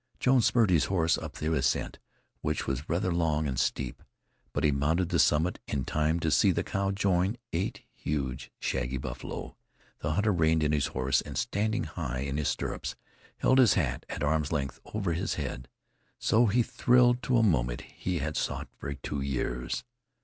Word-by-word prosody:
Jones 130 -3 +4
spurred 115 -6 +3
his 85 -4 +4
horse 80 -4 +2
up - - -6
the 80 +1 -2
ascent, 65 -4 0 0.4
which 75 0 -1
was 65 +3 -3
rather 90 +2 +1
long 80 -3 +1
and 65 -2 -2
steep, 65 +1 -1 0.5
but - - -2
he 75 - +4
mounted 80 +6 +1
the - - +1
summit 80 +5 +3
in 70 -2 -2
time 75 +2 +1
to 80 - +1
see - - +5
the - - +1
cow 100 0 -1
join 95 +1 +1 0.2
eight 85 +4 -2
huge, 70 -4 -3
shaggy 65 +2 -2
buffalo. 65 0 -6 0.4
The 75 +1 -1
hunter 105 +4 +2
reined 80 -2 +3
in 75 - +2
his 75 -2 +2
horse, 65 +1 +1
and - - -7
standing 110 +3 0
high 65 -7 -4
in 70 +1 -2
his 75 -2 0
stirrups, 60 - -2 0.4
held 130 - +4
his 125 -5 +6
hat 70 -9 -1
at - - -4
arms' 75 0 +1
length 70 -3 -2
over 100 -5 -2
his 90 +4 -1
head. 65 -3 -4 0.5
So 115 +2 +3
he 120 +4 +3
thrilled 125 +1 +3
to 125 -1 +2
a 115 - +4
moment - - +1
he 90 -1 -4
had 75 0 -2
sought - - -2
for 70 - -4
two 70 +1 -4
years. 60 -2 -2
80 Hz, 185 wpm, -29 LUFS, 70-95 Hz, 0.5 s, his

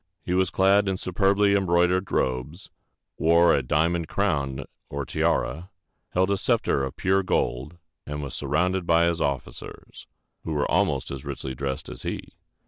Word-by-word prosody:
He 90 - -2
was 95 0 +2
clad 100 +1 +3
in 95 -1 0
superbly 100 +2 +2
embroidered 90 -1 +2
robes, 65 +8 -2 0.5
wore 85 +1 +5
a - - +2
diamond 80 +5 0
crown 70 -9 -1 0.3
or 70 0 -4
tiara, 80 +7 -1 0.4
held 95 +2 +2
a 100 - +2
scepter 70 - +1
of 65 - -4
pure 95 +1 +2
gold, 75 -4 -1 0.3
and 75 0 -4
was 70 - -6
surrounded 90 +6 0
by 85 0 +4
his 85 -1 +1
officers, 65 -4 -5 0.4
who 80 - -3
were 75 -1 0
almost - - +1
as 70 -1 -6
richly 65 - -5
dressed 65 +1 -4
as - - -8
he. - - -5
85 Hz, 155 wpm, -25 LUFS, 70-95 Hz, 0.5 s, wore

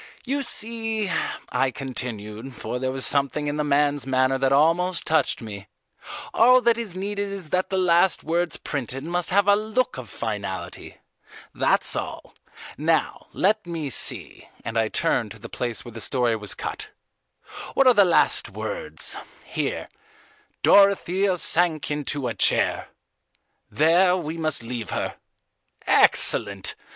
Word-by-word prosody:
You 280 +2 -1
see," 225 -4 +1 0.4
I 130 +1 0
continued, 120 -1 -6
for 125 - -5
there 130 0 -2
was 130 0 -2
something 140 +1 0
in 145 0 -2
the 150 - 0
man's 145 -1 +1
manner 130 0 +1
that 135 0 +1
almost 165 +5 +2
touched 155 -6 0
me, 100 -3 -9 0.7
"all 250 +2 +6
that 235 -1 +3
is 210 -6 -4
needed 200 +1 -4
is 190 -5 -7
that 185 +2 -1
the 190 - -1
last 180 0 +3
words 170 +1 -1
printed 135 -1 -4
must 175 +2 -1
have 200 +1 +2
a 205 - +6
look 220 +4 -2
of - - -10
finality. - - -6 0.6
That's - - +1
all. - - -6 0.5
Now, - - -1
let 215 -3 0
me 160 -5 -4
see," - - +4 0.2
and 115 0 -5
I 110 -1 +2
turned - - -1
to - - -14
the - - -10
place 120 -1 -3
where 120 - -9
the 115 0 -8
story 120 -2 0
was 105 -3 -6
cut, - - -6 0.9
"what 275 - +4
are 255 - +7
the 205 - +5
last 175 -3 +2
words: - - -3 0.3
here: - - -4 0.8
'Dorothea 195 -1 +3
sank 165 -3 +1
into 145 -2 -3
a 115 - -3
chair. - - +2 0.8
There 180 +4 +3
we 160 -2 -5
must 155 -6 -1
leave 115 -2 -6
her!' - - -4 0.7
Excellent! 100 -3 +3
155 Hz, 145 wpm, -23 LUFS, 130-190 Hz, 0.9 s, are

